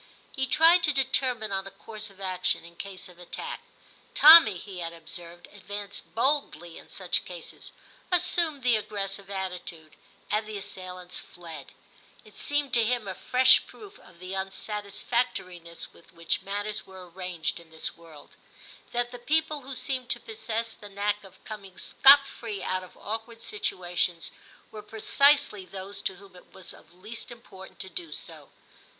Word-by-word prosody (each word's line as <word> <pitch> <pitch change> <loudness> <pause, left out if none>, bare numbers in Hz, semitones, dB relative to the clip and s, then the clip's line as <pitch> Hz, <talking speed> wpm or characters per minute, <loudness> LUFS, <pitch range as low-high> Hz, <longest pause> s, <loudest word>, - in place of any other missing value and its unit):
He 265 -1 -1
tried 330 +6 +7
to 300 - +3
determine 255 -5 +1
on 195 0 -1
a - - -5
course 215 +2 -8
of 195 -1 -18
action 185 -3 0
in 170 0 -13
case 195 +1 -7
of 180 -1 -16
attack. 175 - -6 0.5
Tommy, 310 - +10
he 190 0 -8
had 165 -1 -4
observed, 170 +1 -9
advanced 205 0 -7
boldly 225 - +1
in - - -16
such 185 -2 -1
cases, 175 -2 -9 0.4
assumed 335 -5 +2
the 245 -2 +5
aggressive 200 -2 -4
attitude, 180 -5 -5 0.4
and 215 +1 +1
the 215 -1 -4
assailants 185 -2 -6
fled; 170 -2 -10 0.5
it - - -17
seemed 290 -2 -1
to 235 - +5
him 235 -2 +1
a 190 - -2
fresh 255 +7 +5
proof 410 -1 -13
of 185 - -18
the 185 +1 -6
unsatisfactoriness 195 -2 -2
with 170 - -19
which 170 +6 -1
matters 205 +2 -3
were 190 -1 -11
arranged 175 -2 -3
in 170 -1 -16
this 160 0 -5
world, 160 -3 -15 0.6
that 240 0 0
the 245 - -8
people 305 +3 +1
who 270 0 -7
seemed 255 0 -3
to 240 - 0
possess 225 0 -3
the 205 - -11
knack 205 +1 -1
of 190 -1 -16
coming 195 -4 -9
scot 275 +1 +8
free 225 -6 -6
out 185 0 0
of 185 - -14
awkward 225 +2 -5
situations 180 - -1 0.4
were 215 - -7
precisely 225 +1 +3
those 190 +2 -7
to 190 - -2
whom 195 0 -16
it 180 - -16
was 190 - -9
of - - -17
least 210 +8 -8
importance 190 -5 -12
to - - -5
do 335 - -7
so. - - -8
200 Hz, 160 wpm, -28 LUFS, 185-240 Hz, 0.6 s, Tommy